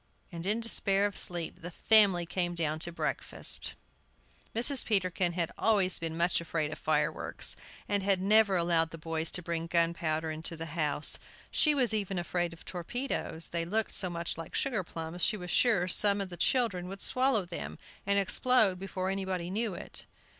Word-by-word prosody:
And, 170 Hz, +1 st, -6 dB
in 215 Hz, +3 st, 0 dB
despair 200 Hz, -3 st, +2 dB
of 205 Hz, -, -2 dB
sleep, 175 Hz, -2 st, -2 dB
the 175 Hz, -, -6 dB
family 195 Hz, -2 st, +4 dB
came 175 Hz, 0 st, -2 dB
down 155 Hz, -2 st, -1 dB
to 170 Hz, -, -4 dB
breakfast. 170 Hz, -, +1 dB, 0.8 s
Mrs. 245 Hz, +4 st, +6 dB
Peterkin 185 Hz, -4 st, +1 dB
had 170 Hz, -2 st, -2 dB
always 200 Hz, -4 st, +2 dB
been 165 Hz, -1 st, -4 dB
much 170 Hz, 0 st, +1 dB
afraid 160 Hz, -2 st, -2 dB
of -, -, -10 dB
fire -, -, +1 dB
works, -, -, +1 dB, 0.3 s
and 205 Hz, -1 st, +1 dB
had 195 Hz, -1 st, +2 dB
never 200 Hz, +1 st, +4 dB
allowed 170 Hz, -2 st, +2 dB
the 165 Hz, -, -9 dB
boys 160 Hz, 0 st, -1 dB
to 180 Hz, -, -2 dB
bring 165 Hz, 0 st, -3 dB
gunpowder 165 Hz, -2 st, 0 dB
into 160 Hz, +1 st, -4 dB
the 165 Hz, -, -5 dB
house. 150 Hz, -2 st, +1 dB, 0.3 s
She 305 Hz, -2 st, +3 dB
was 250 Hz, -5 st, +1 dB
even 200 Hz, -3 st, -1 dB
afraid 175 Hz, 0 st, -2 dB
of 165 Hz, -, -14 dB
torpedoes; 175 Hz, -3 st, -1 dB
they 170 Hz, -1 st, -1 dB
looked 215 Hz, +6 st, -1 dB
so 185 Hz, -, 0 dB
much 170 Hz, -1 st, -3 dB
like 165 Hz, -, -8 dB
sugar 230 Hz, -8 st, -1 dB
plums 165 Hz, +1 st, -5 dB
she 215 Hz, -, +3 dB
was 180 Hz, -2 st, -6 dB
sure 210 Hz, -8 st, +3 dB
some 200 Hz, +2 st, +3 dB
the 190 Hz, -3 st, -4 dB
children 185 Hz, -2 st, 0 dB
would 195 Hz, +1 st, -7 dB
swallow 255 Hz, -6 st, +2 dB
them, 175 Hz, -1 st, -6 dB, 0.3 s
and 200 Hz, 0 st, +1 dB
explode 200 Hz, -1 st, +2 dB
before 190 Hz, 0 st, -3 dB
anybody 190 Hz, -2 st, -3 dB
knew 215 Hz, -1 st, -2 dB
it. -, -, -7 dB
180 Hz, 180 wpm, -30 LUFS, 170-205 Hz, 0.8 s, Mrs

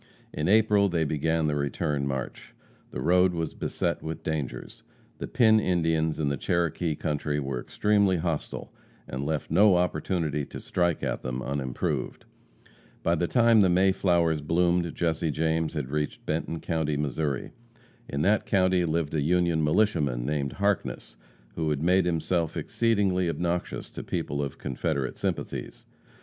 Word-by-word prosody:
In 75 Hz, -, -2 dB
April 105 Hz, -1 st, +4 dB
they 85 Hz, -2 st, +1 dB
began 80 Hz, +2 st, 0 dB
the 75 Hz, -, +1 dB
return 70 Hz, 0 st, -1 dB
march. 65 Hz, -1 st, -5 dB, 0.3 s
The -, -, -5 dB
road 90 Hz, +1 st, +4 dB
was 80 Hz, -1 st, -2 dB
beset -, -, -2 dB
with 80 Hz, 0 st, -6 dB
dangers. 75 Hz, -5 st, -4 dB, 0.4 s
The -, -, -4 dB
Pin 110 Hz, -2 st, +4 dB
Indians 80 Hz, -5 st, +1 dB
in 75 Hz, -2 st, +1 dB
the 70 Hz, -, -1 dB
Cherokee 85 Hz, 0 st, 0 dB
country 75 Hz, -1 st, -2 dB
were 65 Hz, -3 st, -3 dB
extremely 100 Hz, +1 st, +2 dB
hostile, 80 Hz, -2 st, -4 dB, 0.3 s
and 65 Hz, +2 st, -4 dB
left 75 Hz, +1 st, -2 dB
no 100 Hz, -2 st, +6 dB
opportunity 80 Hz, -3 st, 0 dB
to -, -, -8 dB
strike 85 Hz, -3 st, 0 dB
at -, -, -2 dB
them 65 Hz, 0 st, -4 dB
unimproved. 70 Hz, -2 st, -3 dB, 0.8 s
By 85 Hz, -, +2 dB
the 85 Hz, +1 st, 0 dB
time 115 Hz, -1 st, +5 dB
the 95 Hz, -, +4 dB
May 95 Hz, +2 st, +4 dB
flowers 85 Hz, -5 st, +2 dB
bloomed, 85 Hz, +2 st, +1 dB
Jesse 80 Hz, -1 st, 0 dB
James 80 Hz, +1 st, 0 dB
had 70 Hz, -3 st, -4 dB
reached 75 Hz, 0 st, -3 dB
Benton 80 Hz, +1 st, -2 dB
county, 80 Hz, -3 st, -1 dB
Missouri. 70 Hz, -1 st, -2 dB, 0.6 s
In 70 Hz, +1 st, -1 dB
that 105 Hz, +3 st, +2 dB
county 95 Hz, -2 st, +3 dB
lived 80 Hz, -2 st, -1 dB
a 75 Hz, -, +1 dB
Union 85 Hz, 0 st, +2 dB
militiaman 75 Hz, -, +1 dB
named 70 Hz, -1 st, -1 dB
Harkness, 100 Hz, -10 st, -1 dB, 0.4 s
who 80 Hz, +3 st, -1 dB
had 75 Hz, 0 st, -1 dB
made 90 Hz, +2 st, +3 dB
himself 85 Hz, -1 st, 0 dB
exceedingly 100 Hz, -6 st, +1 dB
obnoxious 85 Hz, +1 st, -3 dB
to -, -, -6 dB
people 70 Hz, +1 st, -3 dB
of 70 Hz, -2 st, -4 dB
Confederate 65 Hz, -, -2 dB
sympathies. -, -, -4 dB
80 Hz, 150 wpm, -27 LUFS, 75-90 Hz, 0.8 s, no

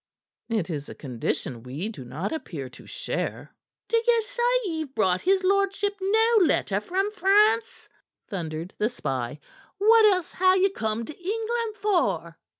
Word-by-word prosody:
"It 210 Hz, -6 st, -1 dB
is 145 Hz, -2 st, -5 dB
a -, -, -8 dB
condition 125 Hz, -2 st, -4 dB
we 135 Hz, -, -5 dB
do 210 Hz, -, -7 dB
not 140 Hz, +10 st, -4 dB
appear 160 Hz, -, -5 dB
to -, -, -15 dB
share." -, -, -4 dB, 0.3 s
"D'ye 465 Hz, 0 st, +3 dB
say 475 Hz, +2 st, -4 dB, 0.2 s
ye've 315 Hz, -6 st, -4 dB
brought 185 Hz, -4 st, +2 dB
his 380 Hz, 0 st, +2 dB
lordship 395 Hz, +1 st, +1 dB
no 445 Hz, +4 st, +3 dB
letter 205 Hz, -, +2 dB
from 385 Hz, -, -1 dB
France?" 425 Hz, +2 st, +2 dB, 0.4 s
thundered 165 Hz, -2 st, -5 dB
the 215 Hz, -, +2 dB
spy. 135 Hz, -, -4 dB, 0.4 s
"What 440 Hz, +2 st, +6 dB
else 370 Hz, -5 st, +3 dB
ha' 370 Hz, +1 st, +4 dB
ye 380 Hz, +1 st, +3 dB
come 220 Hz, -, -2 dB
to 310 Hz, -, -9 dB
England 445 Hz, +4 st, -2 dB
for?" 410 Hz, -4 st, 0 dB
365 Hz, 150 wpm, -26 LUFS, -, 0.4 s, What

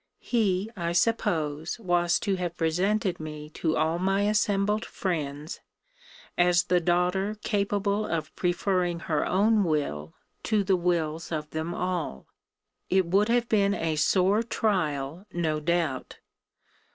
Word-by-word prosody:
He, 205 Hz, -5 st, 0 dB
I 170 Hz, -3 st, -2 dB
suppose, 160 Hz, -6 st, 0 dB
was 175 Hz, -4 st, +2 dB
to 200 Hz, -, 0 dB
have 175 Hz, -2 st, -4 dB
presented 185 Hz, +4 st, 0 dB
me 150 Hz, -1 st, -7 dB
to 160 Hz, 0 st, -1 dB
all 160 Hz, +2 st, +1 dB
my 195 Hz, +2 st, +1 dB
assembled 210 Hz, 0 st, +1 dB
friends, 150 Hz, -4 st, -4 dB, 0.8 s
as 175 Hz, 0 st, +4 dB
the 180 Hz, -, +2 dB
daughter 180 Hz, +4 st, +1 dB
capable 205 Hz, +1 st, 0 dB
of 165 Hz, -2 st, -3 dB
preferring 180 Hz, -1 st, 0 dB
her 155 Hz, -3 st, 0 dB
own 210 Hz, +3 st, +3 dB
will 140 Hz, -, -2 dB, 0.3 s
to 215 Hz, -2 st, +1 dB
the 190 Hz, 0 st, +3 dB
wills 165 Hz, -3 st, -1 dB
of 150 Hz, -1 st, -4 dB
them 160 Hz, +2 st, -3 dB
all. 175 Hz, -, -3 dB, 0.6 s
It 190 Hz, 0 st, +3 dB
would 200 Hz, +5 st, +2 dB
have 240 Hz, 0 st, +2 dB
been 200 Hz, -2 st, +2 dB
a 160 Hz, -1 st, -1 dB
sore 190 Hz, +7 st, +3 dB
trial, 180 Hz, -, -1 dB
no 160 Hz, -3 st, -1 dB
doubt. 160 Hz, -4 st, -1 dB
175 Hz, 130 wpm, -27 LUFS, 160-200 Hz, 0.8 s, as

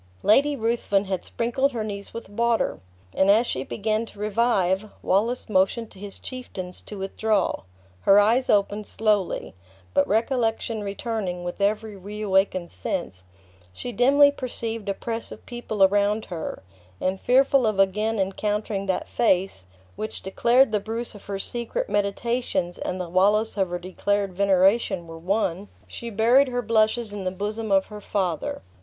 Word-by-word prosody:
Lady 285 Hz, +7 st, +4 dB
Ruthven 225 Hz, -4 st, 0 dB
had 190 Hz, -2 st, -3 dB
sprinkled 255 Hz, +4 st, 0 dB
her 225 Hz, -2 st, -2 dB
niece 200 Hz, -1 st, -6 dB
with 230 Hz, -, -7 dB
water; 235 Hz, +3 st, 0 dB, 0.3 s
and 190 Hz, -, +3 dB
as 220 Hz, +4 st, +5 dB
she 130 Hz, -, -2 dB
began 215 Hz, +7 st, -1 dB
to -, -, -15 dB
revive, 210 Hz, -2 st, +1 dB
Wallace 225 Hz, +6 st, +1 dB
motioned 215 Hz, +3 st, +1 dB
to 190 Hz, -, -14 dB
his 200 Hz, 0 st, -7 dB
chieftains 190 Hz, -8 st, -7 dB
to 210 Hz, -, -9 dB
withdraw; 195 Hz, +1 st, 0 dB, 0.4 s
her 195 Hz, -, +6 dB
eyes 230 Hz, +5 st, +3 dB
opened 205 Hz, +1 st, +2 dB
slowly; 210 Hz, -4 st, 0 dB, 0.4 s
but 190 Hz, -, +3 dB
recollection 225 Hz, 0 st, 0 dB
returning 200 Hz, -3 st, -3 dB
with 175 Hz, +3 st, -5 dB
every 210 Hz, +1 st, 0 dB
reawakened 195 Hz, -2 st, 0 dB
sense, 95 Hz, 0 st, -4 dB, 0.5 s
she 245 Hz, -, -5 dB
dimly 280 Hz, +4 st, +5 dB
perceived 230 Hz, -5 st, -5 dB
a 195 Hz, -, 0 dB
press 230 Hz, +2 st, -5 dB
of -, -, -11 dB
people 240 Hz, -4 st, -1 dB
around 205 Hz, +2 st, +3 dB
her, 160 Hz, -, -5 dB, 0.4 s
and 190 Hz, +1 st, -1 dB
fearful 265 Hz, -1 st, +4 dB
of 215 Hz, -2 st, 0 dB
again 210 Hz, +3 st, +2 dB
encountering 200 Hz, +1 st, -1 dB
that 190 Hz, -, -1 dB
face, 190 Hz, -, +1 dB, 0.3 s
which 215 Hz, -, -5 dB
declared 235 Hz, +6 st, +3 dB
the 210 Hz, -, +2 dB
Bruce 225 Hz, +3 st, -5 dB
of 205 Hz, -, -13 dB
her 200 Hz, -1 st, -3 dB
secret 240 Hz, -, -3 dB
meditations 200 Hz, -3 st, -1 dB
and 185 Hz, -, -3 dB
the 180 Hz, -, -3 dB
Wallace 205 Hz, +5 st, +2 dB
of 190 Hz, -3 st, 0 dB
her 175 Hz, -, -2 dB
declared 195 Hz, +2 st, -1 dB
veneration 195 Hz, 0 st, +3 dB
were 165 Hz, 0 st, -10 dB
one, 190 Hz, +1 st, -1 dB, 0.2 s
she 235 Hz, -, -7 dB
buried 235 Hz, +6 st, +4 dB
her 245 Hz, -1 st, -2 dB
blushes 220 Hz, 0 st, +1 dB
in 205 Hz, -2 st, -5 dB
the 185 Hz, -, 0 dB
bosom 210 Hz, +3 st, -4 dB
of 195 Hz, -1 st, +4 dB
her 210 Hz, -1 st, -10 dB
father. 185 Hz, -, -2 dB
210 Hz, 155 wpm, -25 LUFS, 195-230 Hz, 0.5 s, her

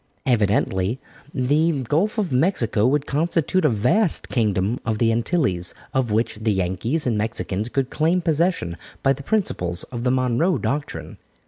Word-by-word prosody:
Evidently 105 Hz, -2 st, +1 dB, 0.3 s
the 145 Hz, +2 st, +1 dB
Gulf 170 Hz, -, 0 dB
of 200 Hz, -7 st, -1 dB
Mexico 125 Hz, -, +2 dB
would 145 Hz, +2 st, +1 dB
constitute 165 Hz, +4 st, 0 dB
a 150 Hz, -, +4 dB
vast 130 Hz, -, +1 dB
kingdom 105 Hz, -1 st, 0 dB
of 110 Hz, -4 st, -1 dB
the 115 Hz, 0 st, +2 dB
Antilles, 115 Hz, -, 0 dB, 0.2 s
of 130 Hz, -4 st, 0 dB
which 110 Hz, +1 st, 0 dB
the 110 Hz, 0 st, +1 dB
Yankees 95 Hz, -, -1 dB
and 120 Hz, -3 st, +1 dB
Mexicans 105 Hz, 0 st, -2 dB
could 135 Hz, 0 st, -1 dB
claim 165 Hz, +4 st, +2 dB
possession 165 Hz, -, 0 dB, 0.3 s
by 135 Hz, -, +4 dB
the 140 Hz, -, -9 dB
principles 90 Hz, -, 0 dB
of 120 Hz, -2 st, -6 dB
the 125 Hz, -, +2 dB
Monroe 130 Hz, +7 st, +1 dB
doctrine. 105 Hz, -, -4 dB
125 Hz, 150 wpm, -22 LUFS, 110-155 Hz, 0.3 s, a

